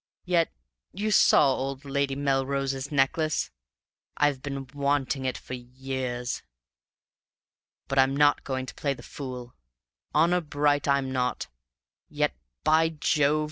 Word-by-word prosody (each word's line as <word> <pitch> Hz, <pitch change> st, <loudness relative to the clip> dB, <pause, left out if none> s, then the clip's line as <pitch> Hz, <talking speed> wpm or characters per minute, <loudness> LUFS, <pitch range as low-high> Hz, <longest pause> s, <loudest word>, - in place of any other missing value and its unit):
Yet 175 Hz, -2 st, +2 dB, 0.4 s
you 210 Hz, +3 st, -1 dB
saw 140 Hz, -8 st, +6 dB
old 135 Hz, +2 st, -4 dB
Lady 140 Hz, 0 st, 0 dB
Melrose's 135 Hz, 0 st, -1 dB
necklace? 150 Hz, +3 st, +1 dB, 0.7 s
I've 145 Hz, -3 st, +2 dB
been 140 Hz, -1 st, -4 dB
wanting 140 Hz, -1 st, 0 dB
it 130 Hz, -, -1 dB
for -, -, -9 dB
years! 125 Hz, 0 st, -4 dB, 1.5 s
But 135 Hz, 0 st, +1 dB
I'm 135 Hz, +1 st, +4 dB
not 145 Hz, 0 st, +4 dB
going 130 Hz, -1 st, -3 dB
to -, -, -8 dB
play 140 Hz, -2 st, -1 dB
the -, -, -13 dB
fool; 125 Hz, -3 st, -7 dB, 0.6 s
honor 170 Hz, +3 st, +3 dB
bright, 145 Hz, -2 st, +1 dB
I'm 140 Hz, -1 st, +2 dB
not; 125 Hz, -, -1 dB, 0.6 s
yet -, -, 0 dB, 0.3 s
by 160 Hz, +1 st, +4 dB
Jove! 150 Hz, -1 st, +2 dB
140 Hz, 125 wpm, -27 LUFS, 130-145 Hz, 1.5 s, saw